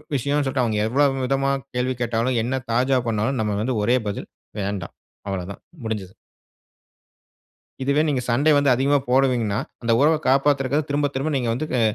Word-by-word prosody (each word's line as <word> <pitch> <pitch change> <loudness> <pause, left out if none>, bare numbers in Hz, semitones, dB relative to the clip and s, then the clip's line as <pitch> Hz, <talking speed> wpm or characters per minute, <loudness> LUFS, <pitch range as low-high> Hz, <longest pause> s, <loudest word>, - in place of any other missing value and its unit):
விஷயம்ன்னு 140 +3 0
சொல்லிட்டு 130 -2 0
அவங்க 110 -2 0
எவ்ளோ 140 +5 +3 0.2
விதமா 135 +1 +1 0.2
கேள்வி 125 +1 0
கேட்டாலும், 120 +2 0
என்ன 130 +2 -2
தாஜா 130 +2 +2
பண்ணாலும் 115 +4 0
நம்ம 105 -2 -1
வந்து 125 +1 -1
ஒரே 120 +4 +3
பதில், 100 - -6 0.3
"வேண்டாம்." 100 -3 -4 0.4
அவ்வளவு 95 -2 -4
தான் - - -18 0.2
முடிஞ்சுது. 100 -4 -4 1.7
இதுவே 140 +3 +2
நீங்க 130 -3 0
சண்டை 140 +6 +3
வந்து 140 -2 +3
அதிகமா 140 +3 +2
போடுவீங்கன்னா, 125 -5 +2 0.4
உறவ 155 +2 +5
காப்பாத்துறதுக்கு 140 +1 +2
திரும்ப 145 0 +1
திரும்ப 150 +4 -1
நீங்க 120 -3 -1
வந்து 155 +6 -3
வெ 125 - +2
130 Hz, 155 wpm, -22 LUFS, 115-140 Hz, 1.7 s, உறவ